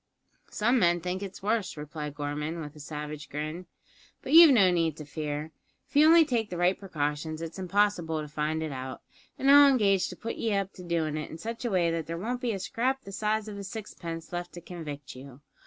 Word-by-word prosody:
"Some 240 +4 +2
men 175 -2 +3
think 180 +2 -3
it's 195 -1 -7
worse," 215 -4 0
replied 150 0 -6
Gorman, 150 +3 -3
with 150 -1 -7
a - - -12
savage 150 0 -6
grin; 155 +5 -5 0.6
"but 265 - -3
you've 330 0 +11
no 200 -9 +6
need 165 -3 +1
to 150 - -8
fear. 150 +1 -4 0.4
If - - -27
you 300 +2 +7
only 330 0 +7
take 235 -6 -1
the 180 - -5
right 175 +2 +3
precautions 155 -3 -3
it's 165 +3 -6
impossible 185 -4 +1
to 150 - -5
find 150 +2 -2
it 155 - -4
out, 130 -1 -6 0.3
an' 270 - -1
I'll 285 0 +9
engage 200 -8 +3
to 180 - -7
put 230 +5 -5
ye 220 -3 0
up 195 -1 -1
to 180 - -11
doin' 165 -3 -1
it 155 - -5
in 160 - -8
such 230 +7 -6
a - - +1
way 175 -4 +2
that 165 -1 -3
there 165 0 -4
won't 240 +7 -3
be 245 -3 0
a 200 - -2
scrap 255 +7 -1
the 195 - -9
size 215 +1 -1
of 205 -1 -7
a - - -6
sixpence 175 -6 -7
left 175 0 -4
to 175 - -9
convict 150 -7 -8
you. 135 +1 -12
175 Hz, 225 wpm, -28 LUFS, 155-210 Hz, 0.6 s, you've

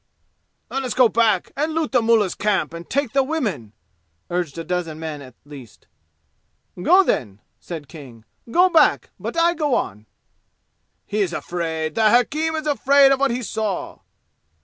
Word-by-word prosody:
"Let 270 - -2
us 245 -5 -3
go 255 -3 +5
back 220 -4 +1
and 310 +3 -2
loot 320 -1 -1
the 250 - +3
mullah's 225 -5 +2
camp 205 -5 -1
and 170 0 -9
take 280 -4 -1
the 275 - +3
women!" 230 - -3 0.6
urged 175 -4 -2
a 165 - -4
dozen 165 -2 -3
men 155 -2 -6
at 130 -3 -13
least. 135 -7 -13 1.0
"Go 365 - +5
then!" 105 - -2 0.2
said 160 -5 -8
King. 130 -7 -13 0.2
"Go 355 +9 +4
back! 340 -3 +3
But - - -5
I 340 +1 +3
go 300 -6 0
on!" 105 +2 -4 1.0
"He 210 +1 -2
is 180 -3 -1
afraid! 160 -3 -3
The 220 +3 +3
hakim 300 +8 +1
is 310 -1 -4
afraid 280 -1 +4
of 270 - +2
what 275 0 +2
he 245 +1 -3
saw!" 215 -3 -4
215 Hz, 165 wpm, -21 LUFS, -, 1.0 s, go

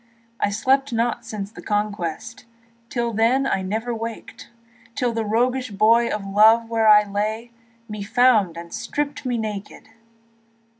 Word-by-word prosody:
I - - +1
slept 265 +6 +1
not 235 +1 -1
since 205 -1 -6
the - - -11
Conquest, 205 -1 -3 0.4
Till 235 -2 -2
then 235 +5 +2
I 195 -7 0
never 220 +6 -3
wakèd, 230 0 -7 0.5
Till 245 -2 0
the 225 0 -1
roguish 250 +4 0
boy 225 +4 +3
of 210 -2 -3
love 220 +3 +4
where 225 -1 +2
I 210 0 +7
lay 215 +3 -3 0.4
Me 210 -2 -7
found 215 -5 +3
and 170 0 -9
stript 290 -1 -4
me 245 -1 -1
nakèd. 210 -2 -6
225 Hz, 145 wpm, -22 LUFS, 205-240 Hz, 0.5 s, I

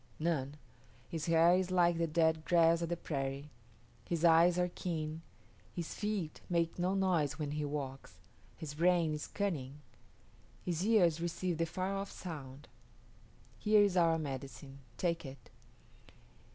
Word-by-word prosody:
None. 150 -3 -1 0.5
His 160 -2 -4
hair 165 +1 +5
is 185 0 +1
like 175 -2 +3
the 165 - +1
dead 160 0 +2
grass 165 0 +4
of 170 - -2
the 175 - -1
prairie; 140 -2 -4 0.5
his 170 -1 -1
eyes 170 +1 +6
are 180 0 +1
keen; 160 -2 -4 0.5
his 170 -2 -4
feet 205 -7 -3
make 170 -1 0
no 185 +2 +1
noise 170 -6 +1
when 150 -2 -3
he 150 0 -2
walks; 135 - -5 0.4
his 150 -3 -6
brain 170 0 +2
is 150 - -4
cunning. 155 -10 -3 0.9
His 175 -1 -1
ears 180 -7 +3
receive 175 0 -2
the 165 - +1
far 185 +4 -2
off 195 0 -3
sound. 145 -5 -8 0.9
Here 210 -1 +5
is 200 -3 +1
our 165 -2 +4
medicine. 135 -2 -6 0.2
Take 170 -2 -1
it." 135 -1 -11
165 Hz, 145 wpm, -34 LUFS, 150-180 Hz, 0.9 s, eyes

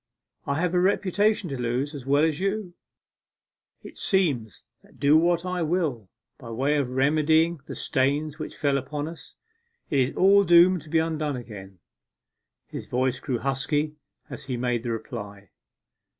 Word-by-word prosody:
I 140 +2 0
have 180 0 0
a 180 - +3
reputation 200 +2 +1
to 135 -2 -4
lose 125 +5 -1
as 135 -3 -8
well 140 +2 +3
as 160 -2 +1
you. 195 -1 -2 1.1
It - - -11
seems 140 - 0 0.2
that - - -23
do 145 +2 +4
what 170 +2 +3
I 180 -1 -2
will 155 - -1 0.3
by 120 -5 -10
way 135 +6 0
of 140 -4 -1
remedying 155 +5 +2
the - - -6
stains 145 +3 -1
which 155 - -7
fell 140 -2 +1
upon 145 +3 -5
us, 165 0 -11 0.6
it 140 - +2
is 130 0 0
all 200 +2 +5
doomed 175 0 +5
to 155 - -15
be 165 - +2
undone 155 -3 -1
again.' 100 -6 -9 0.9
His - - -8
voice 125 0 0
grew 130 -4 -2
husky 145 +4 -1 0.3
as - - -9
he 130 -3 -3
made 120 -1 -1
the 120 0 -3
reply. 100 -4 -7
145 Hz, 165 wpm, -25 LUFS, 125-170 Hz, 1.1 s, all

